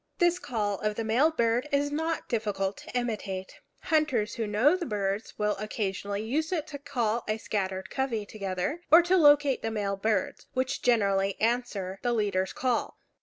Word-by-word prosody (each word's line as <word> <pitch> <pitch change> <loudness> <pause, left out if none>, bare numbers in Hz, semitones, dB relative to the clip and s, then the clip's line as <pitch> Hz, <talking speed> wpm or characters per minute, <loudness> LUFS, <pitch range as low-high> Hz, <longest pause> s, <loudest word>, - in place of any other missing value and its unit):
This 350 0 +3
call 205 - -2
of 210 0 -1
the 225 - -2
male 240 +8 +3
bird 240 -2 0
is 285 +1 +1
not 320 +2 -2
difficult 205 -4 -1
to - - -5
imitate. 205 -6 -4 0.2
Hunters 300 - +1
who 225 -2 -2
know 230 - +4
the 370 - -3
birds 200 0 -2
will 210 0 +1
occasionally 200 -1 -3
use 305 +9 -1
it 320 -5 -1
to 285 -2 -7
call 235 -4 -1
a 215 0 0
scattered 190 -3 -3
covey 245 -6 -1
together, 200 - -3
or 335 +2 +8
to 355 +2 +3
locate 290 -5 +5
the 225 - -2
male 205 -3 -1
birds, 210 -1 -1
which 260 0 -1
generally 200 -5 +2
answer 220 -5 -1
the 245 - 0
leader's 200 -4 0
call. 250 -2 -1
225 Hz, 170 wpm, -28 LUFS, 205-280 Hz, 0.2 s, or